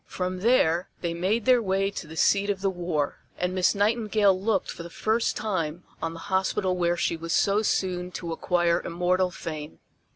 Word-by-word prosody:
From 185 0 -3
there 180 -6 +3
they 170 -1 -1
made 195 +6 0
their 250 -2 +5
way 195 -1 0
to 190 - -7
the 160 - -10
seat 200 +4 +3
of 195 -2 -1
the 195 -1 +1
war, 170 -5 -2 0.2
and 180 +1 -1
Miss 185 +2 +2
Nightingale 210 -1 +3
looked 195 +1 -1
for - - -8
the 170 - -8
first 220 +6 0
time 180 -6 -2 0.2
on 165 0 -2
the 165 - -9
hospital 190 0 +1
where 175 -1 +1
she - - 0
was 165 0 -4
so 200 +1 +3
soon 180 -4 -1
to 170 -2 -4
acquire 175 0 +1
immortal 180 +2 +1
fame. 155 -3 -7
185 Hz, 190 wpm, -26 LUFS, 170-200 Hz, 0.2 s, their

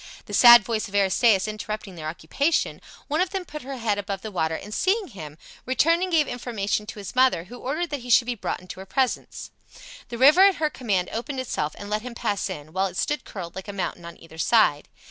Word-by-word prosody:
The - - -10
sad 240 -2 +9
voice 220 0 -2
of 200 - -9
Aristaeus 200 +1 +3
interrupting 215 -1 -5
their 160 -3 -7
occupation, 170 - -1 0.3
one 305 +4 0
of 370 - +1
them 385 -2 -4
put 300 -2 -8
her 270 +1 -7
head 215 -4 -1
above 195 -1 -5
the 220 - -6
water 160 -4 -1
and 210 +5 -8
seeing 390 - 0
him, 155 - -10 0.3
returned 325 +7 +2
and 370 0 -1
gave 310 -4 +3
information 210 -4 -3
to 215 - -8
his 200 +2 -8
mother, 255 -9 +3
who 240 +7 -11
ordered 310 +6 -3
that 290 - -2
he 245 0 -10
should 240 0 +5
be 245 - -1
brought 220 - -4
into 185 0 -10
her 190 - -9
presence. 260 +3 -2 0.6
The 235 - -5
river 290 +9 +7
at 390 - +2
her 305 -1 -1
command 195 -8 -1
opened 260 +4 -4
itself 155 -12 -3
and 205 - -8
let 210 +1 -1
him 245 0 -8
pass 205 -4 -2
in, 150 +1 -8
while 190 +1 +1
it 185 -1 -9
stood 295 - -1
curled 175 -4 -8
like 190 +1 -7
a 205 - -6
mountain 180 -2 -4
on 170 0 -10
either 160 -1 -14
side. 165 -7 +3
215 Hz, 235 wpm, -24 LUFS, 190-260 Hz, 0.6 s, sad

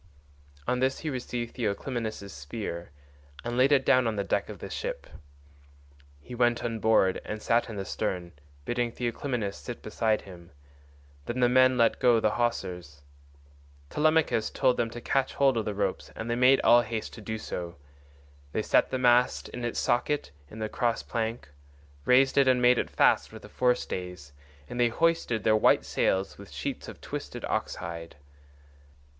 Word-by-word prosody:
On 125 - +1
this 130 +1 0
he 155 - -3
received 120 -2 -4
Theoclymenus' 110 -2 -3
spear 85 +4 -6 0.5
and 120 0 -3
laid 130 +3 +4
it 135 -2 +4
down 130 -2 +4
on 110 - -1
the 100 - -1
deck - - -1
of - - -7
the - - -7
ship. - - -5 1.1
He 125 - -11
went 120 -1 +1
on 115 -1 -2
board 110 -4 +3
and 110 - -5
sat 115 +2 +1
in 110 - -6
the 100 -1 -4
stern, 90 -5 -3 0.3
bidding 120 -1 -1
Theoclymenus 120 -3 -3
sit 120 - -8
beside 110 0 0
him; 85 -4 -13 0.7
then 120 +2 -3
the 125 - +5
men 130 +1 +5
let 115 -1 +3
go 120 -2 +5
the 110 - +2
hawsers. 90 -11 -3 0.9
Telemachus 155 -7 +2
told 130 -2 +2
them 115 -1 0
to 120 +1 -8
catch 135 +1 0
hold 135 -2 +3
of 110 -2 -1
the 105 - -3
ropes, 100 -2 -2
and 115 +1 -4
they - - +1
made 130 +2 +5
all 120 0 +6
haste 115 -1 -5
to 110 - -10
do 110 +2 -4
so. 85 -4 -6 0.8
They - - 0
set - - +3
the 130 - -1
mast 125 0 +3
in 120 - -7
its 120 - -2
socket 140 - 0 0.2
in 110 - -11
the 110 -1 -2
cross 115 +1 -1
plank, 115 -5 -3 0.6
raised 135 +2 +5
it 135 - +4
and 130 -1 +4
made 125 0 +5
it - - -2
fast - - +3
with - - -11
the - - -11
forestays, 90 - -2 0.4
and 120 - -6
they 120 -1 +4
hoisted 165 -6 +1
their 110 -1 +4
white 110 - +4
sails 95 +1 0
with - - -11
sheets - - -5
of - - -10
twisted - - -6
ox - - -2
hide. 85 -1 -7
120 Hz, 175 wpm, -28 LUFS, 105-125 Hz, 1.1 s, all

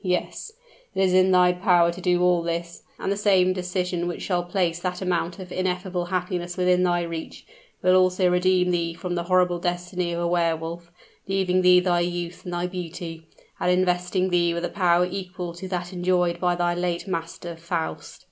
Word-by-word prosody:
Yes; 180 - -2 0.4
it - - -2
is 185 -1 +2
in 185 0 +5
thy 180 -1 +5
power 180 -2 +3
to 180 +2 -9
do 180 -1 +2
all 180 -1 +3
this 170 0 -4 0.2
and 195 - -2
the - - +1
same 190 -3 +3
decision 180 -1 -2
which 175 - -4
shall 180 -2 0
place 175 -1 -1
that 180 0 -3
amount 180 -1 -1
of 185 -2 -9
ineffable 180 -1 -2
happiness 180 0 -3
within 180 0 +3
thy 175 -1 +2
reach, 165 -1 -7 0.4
will 185 0 +5
also 185 0 +3
redeem 180 0 +2
thee 170 -1 -1
from 175 +2 -4
the 170 -1 -2
horrible 180 -1 +2
destiny 175 0 -2
of 170 - -2
a 170 - 0
Wehr 170 -1 +2
Wolf 170 +1 -7 0.4
leaving 190 -1 +1
thee 180 0 +6
thy 180 -1 +2
youth 175 0 -3
and 180 - -5
thy 175 0 -1
beauty, 170 -2 -6 0.3
and - - +1
investing 180 +1 +1
thee 170 -1 +2
with 170 +1 -2
a - - -3
power 180 -2 +3
equal 180 -2 -5
to 175 +2 -8
that 180 0 -4
enjoyed 180 -1 +1
by 180 -1 +1
thy 175 0 +1
late 175 +1 -2
master, 170 -1 -5
Faust." 165 0 -4
180 Hz, 195 wpm, -24 LUFS, 175-185 Hz, 0.4 s, thee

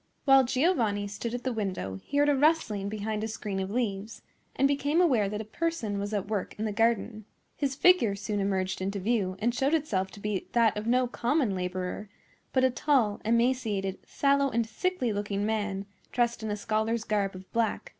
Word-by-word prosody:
While 270 -1 +7
Giovanni 240 - +1
stood 225 +4 -4
at 245 - -5
the 255 - -1
window 185 - -3
he 285 - -3
heard 290 0 +4
a 290 - +4
rustling 265 -9 +2
behind 215 0 -3
a - - -1
screen 210 -3 -4
of 190 0 -2
leaves, 215 -2 -3 0.3
and 275 - +4
became 285 +3 +1
aware 250 - +3
that 210 +1 -3
a - - -7
person 225 -5 -2
was 205 +1 -3
at 205 -2 -2
work 210 -3 -3
in 215 - -2
the 215 - -1
garden. 215 -1 0 0.3
His 275 -2 -1
figure 275 - +4
soon 205 +1 -3
emerged 190 -1 -1
into 195 +2 -2
view, 200 -2 0
and 235 +4 0
showed 270 +5 +2
itself 200 -12 -1
to 205 - -10
be 205 -2 -3
that 230 -2 +4
of 210 +1 -4
no 250 +2 +3
common 245 -1 0
laborer, 185 +2 -4 0.4
but 260 - +2
a 260 - +4
tall, 240 -5 +1
emaciated, 225 -4 +1
sallow, 280 0 +2
and 235 -2 0
sickly 250 - -1
looking 205 0 -2
man, 205 -3 -1 0.3
dressed 235 -1 0
in 220 - -3
a 210 - -2
scholar's 220 +2 -1
garb 200 -3 -1
of 185 0 -12
black. 230 -1 0
220 Hz, 195 wpm, -28 LUFS, 200-255 Hz, 0.4 s, While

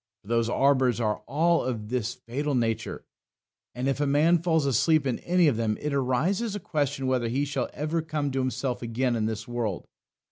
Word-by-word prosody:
For 100 - -15
those 115 0 +1
arbours 130 -2 +3
are 105 -2 0
all 165 +3 +2
of 115 -4 -4
this 125 -1 -2
fatal 135 +4 -3
nature, 115 -2 -1 0.7
that 125 +2 -2
if 135 +1 0
a 145 - +2
man 155 +4 +4
falls 160 -4 +2
asleep 140 +4 +3
in 125 -3 -1
any 175 -1 +3
of 130 -7 +2
them 110 -2 0
it 150 -1 -3
arises 160 - 0
a - - -3
question 145 -6 -2
whether 130 -2 +1
he 135 +5 0
shall 140 -3 -2
ever 155 +3 -2
come 150 -3 -2
to 135 - -1
himself 130 -1 -2
again 120 +1 0
in 110 -1 0
this 110 +1 -4
world. 120 -6 -3
130 Hz, 200 wpm, -27 LUFS, 120-150 Hz, 0.7 s, man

